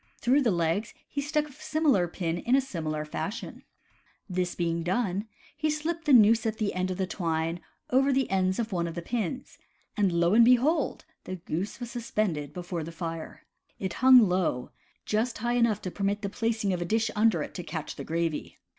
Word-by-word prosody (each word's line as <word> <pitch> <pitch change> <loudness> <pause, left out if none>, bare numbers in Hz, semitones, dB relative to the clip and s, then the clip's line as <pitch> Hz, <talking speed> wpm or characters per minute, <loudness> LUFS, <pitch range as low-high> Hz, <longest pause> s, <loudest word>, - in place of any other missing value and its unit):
Through 260 +4 +3
the 245 - +2
legs 170 +3 0
he 285 - -3
stuck 300 +1 0
a - - -14
similar 300 - +1
pin 170 -1 -3
in 245 +7 +2
a - - +5
similar 155 - -3
fashion. 200 +8 -5 0.7
This 180 -2 -2
being 170 -1 -1
done, 195 +3 -1 0.3
he 310 +1 0
slipped 315 +2 -2
the 295 - +2
noose 225 -2 +6
at 220 0 -2
the 210 -2 -1
end 185 0 -1
of 185 - -3
the 190 - 0
twine 165 -2 -2 0.3
over 270 +2 +4
the 270 -1 +2
ends 185 -1 +1
of 235 -1 -2
one 170 -2 0
of 165 - -6
the 170 - -4
pins. 240 +4 -4 0.4
And 200 -3 +2
lo 170 +2 +2
and 230 +2 +7
behold! 250 +7 +3 0.2
the 185 - -4
goose 180 +5 -4
was 240 -1 -6
suspended 210 - -2
before 175 -2 -4
the 165 - -7
fire. 165 -1 -6 0.3
It 190 -2 -3
hung 255 -4 +8
low 180 -9 0 0.2
— - - -39
just 235 +3 0
high 240 +2 -1
enough 235 -4 +2
to 185 - -3
permit 200 +2 -1
the 200 - -1
placing 220 -2 -1
of 175 - -2
a - - -1
dish 225 +4 +1
under 220 +1 +3
it - - -8
to 180 - -5
catch 160 -3 -5
the - - -6
gravy. 165 -1 -2
200 Hz, 205 wpm, -28 LUFS, 175-240 Hz, 0.7 s, hung